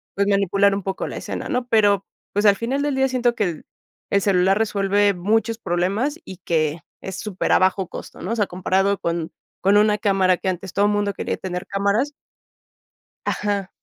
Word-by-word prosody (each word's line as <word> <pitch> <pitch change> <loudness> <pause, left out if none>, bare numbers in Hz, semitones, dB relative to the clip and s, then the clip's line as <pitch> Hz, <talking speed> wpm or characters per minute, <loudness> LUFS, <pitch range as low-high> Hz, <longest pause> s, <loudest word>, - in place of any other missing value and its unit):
pues, 200 0 +1
manipular 200 0 +3
un 200 - -4
poco 190 0 -3
la - - -6
escena, - - -5
¿no? 250 0 -1
Pero, 205 -4 +3 0.3
pues, 205 +1 +1
al 200 -1 +7
final 260 +6 -1
del 290 -1 0
día 265 0 +2
siento 245 -2 +1
que 215 - 0
el 170 -5 -3 0.5
el 200 - +3
celular 190 0 +3
resuelve 205 -1 +2
muchos 220 +5 0
problemas 200 - -1
y 190 - -9
que 160 -3 -1 0.2
es 190 - -6
super 200 -3 -2
a - - +7
bajo 185 0 +2
costo, - - -9
¿no? 185 +6 -4
O - - -1
sea, 210 -3 +2
comparado 190 +2 0
con 170 -1 -2 0.3
con 195 +2 +4
una 210 0 +4
cámara 195 -3 +2
que 190 - -2
antes 185 0 -5
todo 205 +1 +3
mundo 205 -1 0
quería - - -3
tener 180 0 -5
cámaras 200 +9 0 1.1
Ajá. 200 -2 -1
200 Hz, 190 wpm, -22 LUFS, 185-210 Hz, 1.1 s, al